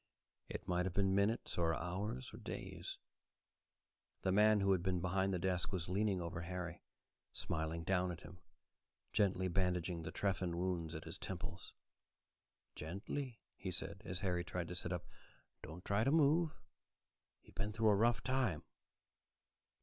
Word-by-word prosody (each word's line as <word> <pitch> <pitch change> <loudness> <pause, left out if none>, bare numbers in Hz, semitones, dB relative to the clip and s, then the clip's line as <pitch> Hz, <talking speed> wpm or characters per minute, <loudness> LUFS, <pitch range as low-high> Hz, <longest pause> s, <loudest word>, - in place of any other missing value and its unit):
It - - -5
might 90 0 +2
have 90 - -4
been 95 -1 +4
minutes, 100 0 +2
or 80 -1 +3
hours, 90 -5 -3
or - - -7
days. - - -5 1.3
The 95 - +3
man 105 +2 +6
who 100 0 +4
had 95 -2 +4
been 90 -1 +1
behind 95 +2 +1
the 90 - +1
desk 90 0 0
was 90 -4 -2
leaning 100 0 +2
over 85 0 -3
Harry, 90 -1 -4 0.5
smiling 80 +1 -1
down 90 +1 +2
at 85 - -7
him, 90 +3 -11 0.7
gently 95 -3 +3
bandaging 90 -2 +1
the 80 0 -5
trephine 90 -3 0
wounds 85 -3 -1
at 80 - -5
his - - -7
temples. - - -5 1.0
"Gently," 115 - -4
he - - -4
said, - - -4
as 90 +1 -3
Harry 90 -3 +1
tried 90 0 -3
to 90 - -4
sit 90 0 -3
up. 90 -1 -2 0.6
"Don't 80 +3 -8
try 100 +2 +3
to 135 - +3
move. 155 +2 +4 0.9
You've - - -17
been 105 +2 -1
through 110 0 +3
a 105 - +6
rough 115 +3 +3
time." 130 - +1
90 Hz, 155 wpm, -38 LUFS, 85-100 Hz, 1.3 s, man